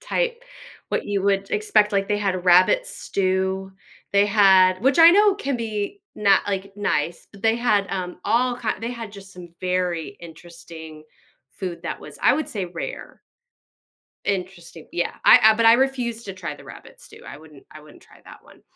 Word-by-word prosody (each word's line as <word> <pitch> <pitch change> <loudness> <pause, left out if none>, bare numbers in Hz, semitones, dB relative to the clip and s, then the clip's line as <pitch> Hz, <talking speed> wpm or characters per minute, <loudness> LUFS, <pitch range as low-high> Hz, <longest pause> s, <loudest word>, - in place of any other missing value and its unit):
type, 485 -1 -2 0.5
what - - -1
you 200 -2 -2
would 195 -1 0
expect, 210 0 +2
like, 195 -1 0
they 205 - 0
had 190 -3 -2
rabbit 185 - +4
stew, 190 0 -2 0.4
they 200 0 +4
had- 190 -3 +4
which 270 +4 +2
I 330 +1 +9
know 410 +1 +4
can 280 -10 -3
be 225 - -5
not, 200 -2 +3
like, 195 0 -4
nice- 170 -5 -2
but 200 - -16
they 225 0 +2
had, 215 -5 +1
um, 180 -2 -5
all 240 +3 +1
kind 230 -3 -4
they 230 - -3
had 230 -3 -8
just 195 -1 -13
some 180 -1 -12
very 180 -3 -2
interesting 165 -2 -12 0.5
food 180 0 -7
that - - -5
was, - - -12
I - - +5
would 310 - -3
say, 195 -4 -4
rare. 175 -1 -8 1.1
Interesting, 180 -4 -5
yeah, 175 - -2
I - - +9
I 220 0 +6
but 230 +1 +1
I 230 - +8
refuse 245 -3 -1
to 195 - -7
try 170 -5 -7
the - - -16
rabbit - - -14
stew, - - -16
I - - -9
wouldn't 150 -2 -17
I 155 - -13
wouldn't 150 -1 -17
try - - -21
that - - -15
one. - - -20
195 Hz, 185 wpm, -22 LUFS, 180-225 Hz, 1.1 s, I